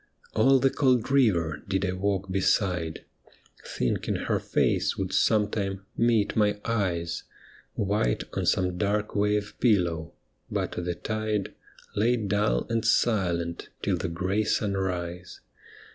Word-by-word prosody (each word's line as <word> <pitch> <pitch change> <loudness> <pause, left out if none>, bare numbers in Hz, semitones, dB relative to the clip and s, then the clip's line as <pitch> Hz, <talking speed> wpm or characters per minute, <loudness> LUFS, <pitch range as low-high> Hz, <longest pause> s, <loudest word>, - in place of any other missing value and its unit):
All 135 0 +5
the 135 +1 +3
cold 130 -3 +2
river 90 - +2
did 95 0 0
I 90 - 0
walk 95 0 -1
beside, 90 -3 0 0.6
Thinking 60 - -1
her - - -1
face - - +1
would - - -3
some 105 -1 +3
time 100 -2 -3
meet 115 -3 +2
my 105 -1 +2
eyes 90 -7 -1 0.5
White 100 - 0
on - - -2
some 90 -1 +1
dark 105 +2 0
wave 105 0 +1
pillow, 85 -7 +1 0.4
but - - -2
the 90 0 -3
tide 110 -1 -2 0.4
Lay 115 +4 +3
dull 105 - 0
and 115 -1 -1
silent 90 -8 +1
till - - +1
the - - -3
grey 95 +5 0
sunrise. 90 -4 -2
100 Hz, 130 wpm, -27 LUFS, 90-110 Hz, 0.6 s, All